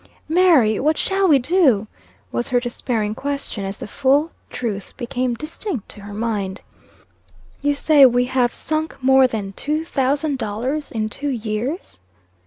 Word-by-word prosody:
"Mary, 315 - +4
what 310 +3 +2
shall 385 0 +1
we 300 -5 +6
do?" 265 - +3 0.5
was 120 0 -2
her 245 - +3
despairing 235 -3 -2
question, 280 -5 -4
as 195 +1 -4
the - - -6
full 280 +8 +2 0.2
truth 210 -5 -4
became 250 -1 -2
distinct 305 - -5
to 205 - -10
her 205 +1 -9
mind. 205 -4 -2 1.0
"You 290 +1 +1
say 285 -2 +6
we 245 0 +2
have 250 -1 +1
sunk 315 0 -3
more 265 0 +6
than 205 -5 -4
two 305 +8 -2
thousand 280 -1 0
dollars 255 +8 -3
in 215 -2 -1
two 285 +7 -4
years?" 235 - -3
255 Hz, 150 wpm, -21 LUFS, 220-295 Hz, 1.0 s, we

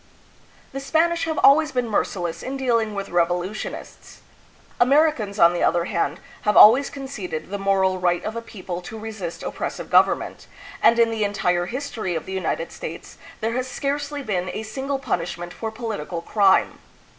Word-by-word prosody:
The 275 - -5
Spanish 330 +4 +1
have 315 -1 -2
always 300 +2 +6
been 250 -2 -1
merciless 175 -5 -2
in 270 +1 -4
dealing 230 -5 0
with 200 0 -4
revolutionists. 175 +4 -3 0.6
Americans, 255 -6 +3
on 170 -2 +6
the 175 - -2
other 170 -1 +2
hand, 170 -4 -1 0.2
have 210 - +1
always 255 +6 +8
conceded 210 - -6
the 200 - -3
moral 190 -1 +1
right 175 -1 0
of 220 - -4
a 230 - -3
people 185 -6 -7
to 220 +5 -8
resist 215 -6 -6
oppressive - - -5
government, - - +2 0.3
and 235 - +5
in 230 -1 +4
the 220 -1 -1
entire 180 -4 0
history 235 -8 -4
of 160 - -4
the 190 - -6
United 170 -3 -2
States - - -8 0.2
there 225 +1 -1
has 255 +1 -2
scarcely 285 +2 -3
been 185 -6 -2
a 220 - -4
single 270 +5 -3
punish 175 -11 -2
ment 175 0 -7
for 225 - -4
political 210 -7 -5
crime. 195 0 +3
215 Hz, 170 wpm, -23 LUFS, 180-260 Hz, 0.6 s, always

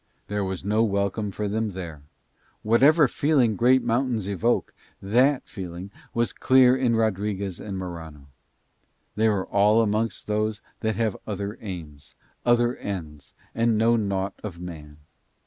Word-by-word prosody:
There 105 0 -1
was 95 -1 -4
no 105 +2 +2
welcome 100 0 -1
for 105 +2 -3
them 110 +2 -1
there: 85 -6 -7 0.6
whatever 140 +8 +5
feeling 130 -6 +2
great 125 +4 +4
mountains 120 -3 0
evoke, 105 +5 0 0.3
THAT 125 +8 +2
feeling 90 0 -7 0.2
was 120 0 +1
clear 130 -1 +5
in 125 -3 +1
Rodriguez 100 -3 -1
and 100 -2 -5
Morano. 80 -6 -7 0.9
They 110 +1 +3
were 100 -3 0
all 105 +3 +4
amongst 110 -1 -1
those 105 0 -1 0.2
that 110 -1 -1
have 110 -1 0
other 100 0 -4
aims, 80 -8 -8 0.3
other 120 +1 +3
ends, 80 -7 -7 0.2
and 115 -1 +2
know 115 +2 +4
naught 100 -3 -1
of 90 -6 -6
man. 80 -4 -9
105 Hz, 140 wpm, -25 LUFS, 95-115 Hz, 0.9 s, whatever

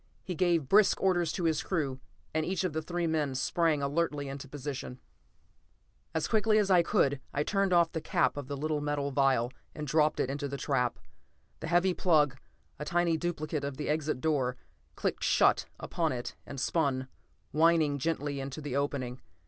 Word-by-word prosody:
He 185 - -4
gave 170 -4 +1
brisk 205 +6 +5
orders 175 -4 +2
to 180 - -3
his 160 -2 +2
crew, 140 -8 -2 0.3
and 160 0 +1
each 185 +4 -1
of 180 -4 -1
the 160 - -1
three 175 +2 -2
men 155 -4 0
sprang 155 +2 +1
alertly 145 0 -1
into 140 0 -7
position. 135 -2 -6 1.2
As 160 - 0
quickly 220 -1 +3
as 205 -2 +2
I 180 -2 +7
could, 145 -4 +2 0.2
I 145 - +2
turned 195 +2 +1
off 170 -2 +4
the 160 - -3
cap - - +1
of 145 -2 -6
the 140 0 -4
little 150 +1 -1
metal 145 -1 -1
vial 130 -3 +2 0.2
and 150 - -4
dropped 150 +1 +2
it - - +1
into 140 +2 -3
the 140 0 -5
trap. 125 -3 0 0.6
The 160 - -5
heavy 175 +2 +3
plug, 150 -7 +3 0.4
a - - -3
tiny 170 0 +2
duplicate 155 -3 -2
of 140 -2 -4
the 150 - -3
exit 150 -3 -1
door, 135 -6 0 0.4
clicked - - -2
shut - - +3
upon 165 -2 -1
it 120 -1 -5
and 140 - -6
spun, 135 -3 0 0.4
whining 155 -2 +3
gently, 145 -1 -1
into 135 +2 -5
the 145 -3 -4
opening. 135 -3 -2
150 Hz, 180 wpm, -30 LUFS, 140-170 Hz, 1.2 s, I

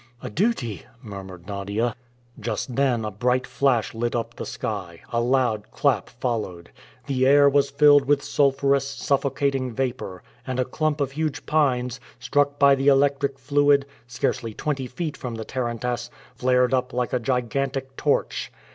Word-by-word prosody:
"A 125 - -5
duty!" 125 - -1 0.2
murmured 95 -4 -9
Nadia. 100 +4 -2 0.4
Just 115 +2 -3
then 125 -5 +1
a 105 - -3
bright 125 +5 +1
flash 130 -5 +1
lit 120 +1 -2
up 115 0 -2
the - - -6
sky; 100 - -5
a 115 - +2
loud 120 -4 +1
clap 140 -5 +1
followed. 110 -9 -4 0.3
The 130 -1 +1
air 140 +1 +7
was 140 0 +3
filled 145 0 +6
with 140 0 +2
sulphurous 140 -1 +2
suffocating 135 -1 0
vapor, 120 -7 -3 0.2
and 130 -1 -2
a 130 - +2
clump 155 +1 -1
of 135 -1 0
huge 155 +1 -3
pines, 125 -5 +1 0.2
struck 145 +3 +1
by 140 -1 +6
the 135 +1 0
electric 140 0 +3
fluid, 140 +1 +3 0.2
scarcely 115 -2 -2
twenty 135 -4 -2
feet 150 +5 -4
from 120 -2 -6
the 110 -1 -6
tarantass, 120 -1 -3 0.2
flared 125 0 +2
up 130 -1 0
like 125 -1 -1
a 125 - +2
gigantic 135 +2 -2
torch. - - 0
130 Hz, 155 wpm, -24 LUFS, 120-140 Hz, 0.4 s, air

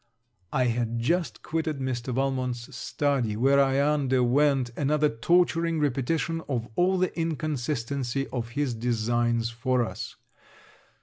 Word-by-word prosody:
I 130 - +2
had 120 -1 0
just 155 +3 -1
quitted 160 -2 -2
Mr. 130 -1 -3
Valmont's 125 -2 -2
study, 135 -8 -1
where 135 +4 +4
I 135 -1 +3
underwent 135 -2 +2
another 150 +1 +2
torturing 165 +5 +2
repetition 150 +4 0
of 120 -4 -1
all 185 +2 +3
the 185 0 0
inconsistency 140 -5 -2
of 120 -3 -4
his 145 -4 +1
designs 115 0 0
for 125 +1 0
us. - - -7
135 Hz, 120 wpm, -27 LUFS, 120-150 Hz, -, where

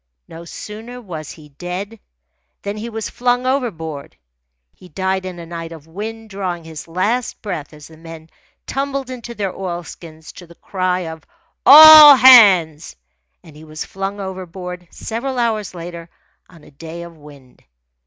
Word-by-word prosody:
No 165 +1 -11
sooner 220 +7 -10
was 165 - -9
he 150 -2 -16
dead 180 +9 -7 0.6
than 200 +1 -4
he 220 +2 -7
was 225 -1 -5
flung 245 0 -1
overboard. 165 - -4 0.6
He 180 - -18
died 190 +3 -3
in 180 -1 -8
a 170 - -9
night 165 0 -8
of 160 -3 -12
wind, 215 +6 -8
drawing 185 -4 -5
his 160 -1 -10
last 210 +9 -2
breath 180 -8 -6
as 150 -1 -14
the 160 - -17
men 165 0 -13 0.3
tumbled 275 -1 -4
into 240 -1 -9
their 200 -4 -3
oilskins 170 -3 -8
to 175 - -12
the 170 - -17
cry 185 0 -2
of 160 -2 -8 0.4
"All 305 -1 +11
hands!" 195 - +6 0.5
And 155 -3 -16
he 155 - -14
was 155 0 -8
flung 195 +1 -6
overboard, 180 -2 -8
several 250 +4 -5
hours 220 -5 -2
later, 170 0 -9 0.4
on 165 -4 -18
a - - -18
day 165 +4 -10
of 170 -1 -12
wind. 145 -4 -18
180 Hz, 155 wpm, -18 LUFS, 165-225 Hz, 0.6 s, All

